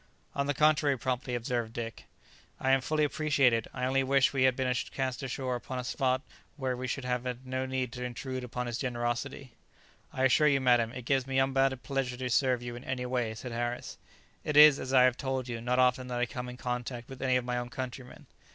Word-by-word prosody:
"On 140 0 -1
the 145 - 0
contrary," 150 -2 +3
promptly 125 0 -2
observed 120 -1 -2
Dick; 115 -2 -6 0.5
"I 135 0 +4
fully 150 +3 0
appreciate 150 -4 +3
it; 115 -1 0
I 125 -1 -3
only 135 +1 +2
wish 135 +1 +3
we 130 -1 +3
had 130 -1 +4
been 130 -1 0 0.2
cast 130 -1 -3
ashore 130 -1 -2
upon 125 +1 -5
a 125 - -3
spot 130 +1 0 0.3
where 130 -3 -1
we 130 +1 -4
should 130 +1 -3
have 125 -1 -1
had 125 +1 -5
no 130 0 -2
need 130 -2 -2
to 125 -1 -6
intrude 130 +1 -4
upon 125 0 -4
his 120 -1 -3
generosity." 125 +1 -3 0.6
"I 130 - -2
assure 135 +4 +5
you, 140 -2 +4
madam, 120 -3 +3
it 125 -1 -8
gives 135 0 +1
me 135 0 -1
unbounded 135 -1 +2
pleasure 130 0 -2
to 125 0 -3
serve 125 -1 +2
you 120 0 -5
in 120 - -9
any 130 -1 -3
way," 125 -3 -1
said 125 +2 -7
Harris; 120 +1 -4 0.4
"it 150 - -1
is, 150 -2 +9
as 130 - -5
I 130 -1 +6
have 125 -1 +3
told 130 -2 -2
you, 115 -2 -4
not 125 +2 0
often 125 0 +3
that 125 -1 -3
I 125 - +2
come 125 +1 -6
in 125 - -8
contact 125 -1 -4
with 135 -1 -10
any 130 -1 +2
of 125 -1 +1
my 125 0 -1
own 120 0 -5
countrymen." 125 -1 -7
125 Hz, 225 wpm, -30 LUFS, 125-135 Hz, 0.6 s, is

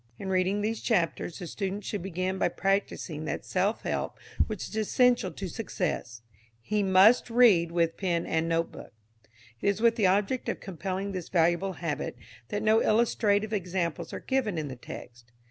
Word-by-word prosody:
In 195 - -5
reading 190 +2 +1
these 220 +2 -2
chapters 175 -5 0
the 180 - -6
student 195 +3 -4
should 205 -1 -3
begin 185 +1 -2
by - - +3
practising 195 -5 -1
that - - -4
self 195 +4 0
help - - -2 0.3
which 215 -3 -4
is - - -9
essential 240 0 +3
to 195 - -5
success. 175 - -3 0.4
He 210 - -1
must 195 +6 +5
read 220 -9 +5
with 170 -1 +1
pen 175 -3 0
and 165 0 0
notebook. 165 0 -2 0.7
It - - -1
is 200 0 0
with 230 +1 +3
the 205 -4 +4
object 205 +7 +1
of - - -2
compelling 195 +1 -4
this 185 -3 -5
valuable 175 +2 +2
habit 165 -8 -3 0.3
that 205 - -3
no 220 +1 +5
illustrative 215 -1 +2
examples 180 -4 -2
are - - -5
given 240 -9 -1
in 150 -2 -3
the 130 - -6
text. 120 -1 -11
190 Hz, 170 wpm, -28 LUFS, 170-210 Hz, 0.7 s, must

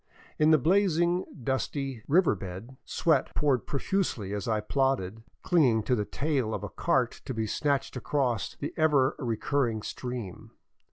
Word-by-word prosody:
In 155 0 +5
the 155 - +7
blazing, 175 +2 +2 0.2
dusty, 135 -1 -2
river 175 +4 +4
bed, 95 +6 -8
sweat 165 - +1
poured 140 -5 +1
profusely 140 - -1
as 100 -2 -3
I 110 -2 +1
plodded, 115 -3 0 0.2
clinging 130 -11 +3
to 125 - 0
the 105 -3 -1
tail 135 -6 -1
of - - -6
a - - -4
cart 130 -8 0
to 130 - -4
be 110 0 -1
snatched 140 +6 -1
across 125 -4 -1
the 145 - -5
ever 145 -4 +3
recurring 120 -1 -1
stream. 125 -8 -6
130 Hz, 150 wpm, -28 LUFS, 110-150 Hz, 0.2 s, the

